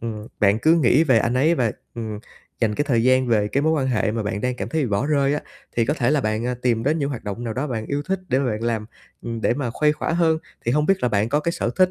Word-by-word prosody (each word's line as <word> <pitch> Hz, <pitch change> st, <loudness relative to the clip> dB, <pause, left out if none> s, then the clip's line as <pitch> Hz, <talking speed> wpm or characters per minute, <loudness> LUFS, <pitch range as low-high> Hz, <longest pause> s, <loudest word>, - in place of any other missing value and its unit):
ừm, 110 Hz, -2 st, -5 dB
bạn 100 Hz, 0 st, +4 dB
cứ 160 Hz, +7 st, +4 dB
nghĩ 150 Hz, 0 st, +4 dB
về 130 Hz, -7 st, +4 dB
anh 115 Hz, +3 st, 0 dB
ấy 155 Hz, +6 st, +3 dB
và, 120 Hz, -8 st, 0 dB, 0.2 s
ừm, 110 Hz, -3 st, -5 dB, 0.4 s
dành 110 Hz, -2 st, +1 dB
cái 145 Hz, -, 0 dB
thời 115 Hz, -3 st, +3 dB
gian 130 Hz, 0 st, +4 dB
về 105 Hz, -3 st, +2 dB
cái 140 Hz, -, 0 dB
mối 160 Hz, +1 st, +2 dB
quan 145 Hz, -4 st, 0 dB
hệ 115 Hz, -4 st, +1 dB
mà 115 Hz, 0 st, -2 dB
bạn 105 Hz, 0 st, -3 dB
đang 125 Hz, +2 st, -1 dB
cảm -, -, -4 dB
thấy 160 Hz, -1 st, 0 dB
bị -, -, 0 dB
bỏ 100 Hz, +7 st, 0 dB
rơi 140 Hz, -1 st, +2 dB
á, -, -, -2 dB, 0.4 s
thì 115 Hz, -, +3 dB
có 150 Hz, -, +1 dB
thể 125 Hz, -4 st, +1 dB
là 150 Hz, -2 st, +2 dB
bạn, 110 Hz, +1 st, -1 dB
à, 125 Hz, -, -1 dB
tìm 115 Hz, -3 st, +1 dB
đến 150 Hz, +6 st, +1 dB
những 140 Hz, -, -1 dB
hoạt 125 Hz, -, -6 dB
động 105 Hz, +4 st, -5 dB
nào 115 Hz, -, -3 dB
đó 135 Hz, +4 st, -2 dB
bạn 110 Hz, -5 st, -4 dB
yêu 145 Hz, +1 st, -2 dB
thích 190 Hz, -1 st, 0 dB
để 130 Hz, +1 st, +2 dB
mà 140 Hz, -, 0 dB
bạn 110 Hz, +1 st, -4 dB
làm, 115 Hz, -2 st, -1 dB, 0.4 s
ừm, 115 Hz, -1 st, -4 dB
để 115 Hz, -, +1 dB
mà 130 Hz, -4 st, -2 dB
khuây 150 Hz, +5 st, +2 dB
khỏa 150 Hz, -, -3 dB
hơn. 160 Hz, -2 st, +2 dB, 0.3 s
Thì 120 Hz, -, +1 dB
hông 150 Hz, +2 st, +2 dB
biết 195 Hz, +1 st, +2 dB
là 125 Hz, -, +3 dB
bạn 105 Hz, 0 st, +1 dB
có 145 Hz, +3 st, +1 dB
cái 170 Hz, +2 st, -1 dB
sở -, -, -1 dB
thích 185 Hz, 0 st, +4 dB
125 Hz, 315 wpm, -22 LUFS, 115-150 Hz, 0.4 s, bạn